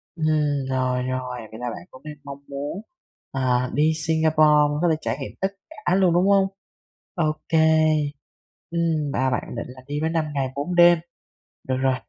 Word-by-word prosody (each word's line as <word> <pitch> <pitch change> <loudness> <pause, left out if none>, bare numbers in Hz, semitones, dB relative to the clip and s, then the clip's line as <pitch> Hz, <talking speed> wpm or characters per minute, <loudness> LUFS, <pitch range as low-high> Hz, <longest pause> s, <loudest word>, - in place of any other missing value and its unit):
Ừm, 160 - -2 0.4
rồi, 130 -1 0
rồi, 130 -1 -3
vậy 110 - -9
là 125 0 -3
bạn 90 -6 -8
cũng 130 - -14
đang 150 -1 -8
mong 140 0 -8
muốn, 145 +7 -5 0.5
à, 125 -1 +1
đi 155 +2 +3 0.2
Singapore 160 -1 +3 0.4
có 175 - +3
thể - - +3
trải - - -2
nghiệm 135 - -5
tất 190 - +3 0.2
cả 285 - -1
luôn, 185 -3 +4
đúng 180 +3 +3
hông? 195 -1 +4 0.7
Ô 155 -3 +1 0.2
kê, 160 - +2 1.1
ừm, 160 -4 0
bà 130 0 +1
bạn 125 - -1
định 115 - -5
là 130 0 -11
đi 145 +1 -3
với 160 - +1
5 165 -1 0
ngày 135 -2 0
4 150 +6 -3
đêm. 175 0 +7 0.7
Được 130 - +1
rồi. 130 0 +2
145 Hz, 185 wpm, -23 LUFS, 130-170 Hz, 1.1 s, đêm